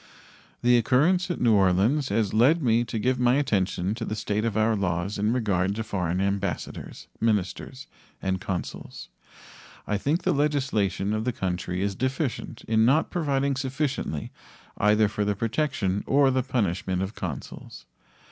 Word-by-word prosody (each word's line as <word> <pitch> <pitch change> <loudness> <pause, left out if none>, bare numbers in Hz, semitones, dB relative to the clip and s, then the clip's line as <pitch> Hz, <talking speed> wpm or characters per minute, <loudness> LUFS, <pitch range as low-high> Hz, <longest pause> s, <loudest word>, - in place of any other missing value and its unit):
The 120 0 +5
occurrence 165 - +2
at 175 - -2
New 115 -2 +4
Orleans 100 +9 +3
has 110 -3 0
led 140 +9 +4
me 115 -1 +3
to 115 - -4
give 125 +3 0
my 125 0 +4
attention 100 -8 0
to 115 +1 -5
the 110 - -3
state 105 0 -1
of 110 -2 -1
our 110 +1 +3
laws 95 +1 -2
in 105 +2 +1
regard 100 -5 0
to 110 - -2
foreign 90 -4 -2
ambassadors, 100 0 -3
ministers, 115 +4 -1 0.3
and 95 -1 -2
consuls. 95 -2 -5 0.8
I 105 -1 -1
think 150 - 0
the - - +2
legislation 130 -9 0
of 110 0 -1
the 125 - 0
country 90 -4 -3
is 100 0 0
deficient 130 - -3
in 110 0 +2
not 140 +7 +3
providing 140 -4 0
sufficiently 135 - -3 0.4
either 105 +1 +3
for 105 0 -2
the 105 0 0
protection 115 -4 -1
or 140 -1 +4
the 130 0 +1
punishment 95 -7 -1
of 95 +3 -4
consuls. 70 - -7
110 Hz, 155 wpm, -26 LUFS, 100-130 Hz, 0.8 s, The